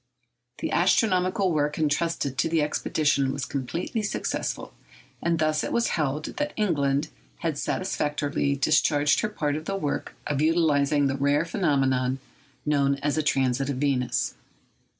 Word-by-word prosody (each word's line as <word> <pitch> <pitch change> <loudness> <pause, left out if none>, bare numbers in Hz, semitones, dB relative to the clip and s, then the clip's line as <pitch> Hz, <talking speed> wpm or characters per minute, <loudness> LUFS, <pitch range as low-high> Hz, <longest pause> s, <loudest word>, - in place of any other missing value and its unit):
The - - -2
astronomical 185 +1 +2
work 150 -1 0
entrusted 155 -2 0
to 165 - +1
the 160 -2 +2
expedition 145 -2 +1
was 135 0 -3
completely 165 - -3
successful; 210 - -3 0.5
and 170 -1 +1
thus 155 -1 +1
it - - -3
was 235 0 +1
held 150 -1 -1
that 295 0 -1
England 150 -7 +1 0.3
had 165 -3 -1
satisfactorily 145 -4 -1
discharged 145 +1 +3
her 215 - 0
part 150 -8 -1
of 155 +1 -5
the 195 - -2
work 150 -7 -3
of 145 -1 -1
utilising 150 -3 +3
the 135 0 0
rare 145 +3 +2
phenomenon 135 -7 +1 0.5
known 140 -2 +2
as 145 0 +1
a 155 - +2
transit 135 -2 +1
of 140 - -2
Venus. 130 -3 0
150 Hz, 145 wpm, -26 LUFS, 140-165 Hz, 0.5 s, discharged